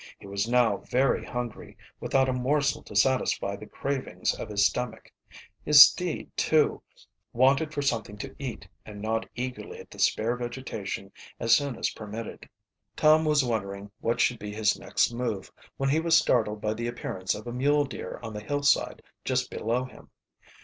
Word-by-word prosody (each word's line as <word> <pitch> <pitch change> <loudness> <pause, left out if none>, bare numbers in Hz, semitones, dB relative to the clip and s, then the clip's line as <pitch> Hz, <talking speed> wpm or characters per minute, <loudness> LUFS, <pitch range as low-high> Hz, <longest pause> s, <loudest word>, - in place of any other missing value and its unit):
He - - -15
was 100 +3 -2
now 125 -1 +3
very 130 +2 +1
hungry, 120 -2 -6 0.2
without 135 -1 +2
a 130 - 0
morsel 140 +3 +1
to - - -11
satisfy 100 -3 +2
the 105 +1 -11
cravings 140 -1 -2
of - - -7
his 100 -1 +2
stomach. 120 -1 -2 0.5
His 145 -1 +11
steed, 180 -3 -1
too, 155 -2 +2 0.5
wanted 135 +5 +3
for 145 -2 -2
something 115 -6 -1
to - - -7
eat, 120 - -6 0.2
and 105 -1 -10
gnawed 110 +2 -2
eagerly 125 +1 -5
at - - -13
the - - -12
spare 115 +3 +2
vegetation 120 -5 -5 0.3
as 115 -1 +5
soon 140 0 -1
as - - -1
permitted. 110 +1 -8 0.5
Tom 155 +1 +5
was 150 -3 +3
wondering 100 -3 -3
what 115 - -1
should 120 -2 +2
be 105 0 -6
his 105 0 +1
next 110 +3 +1
move 115 -6 -3 0.3
when 135 0 0
he 150 +3 +3
was 165 0 +4
startled 105 -3 +1
by 105 0 0
the 115 +2 -4
appearance 95 -5 -3
of 105 - -9
a 120 - -5
mule 145 +3 +2
deer 135 - -7
on 110 -1 -6
the 105 - -5
hillside 145 +5 +1 0.2
just - - -1
below 120 +3 -1
him. 130 - -15
120 Hz, 175 wpm, -27 LUFS, 105-135 Hz, 0.5 s, His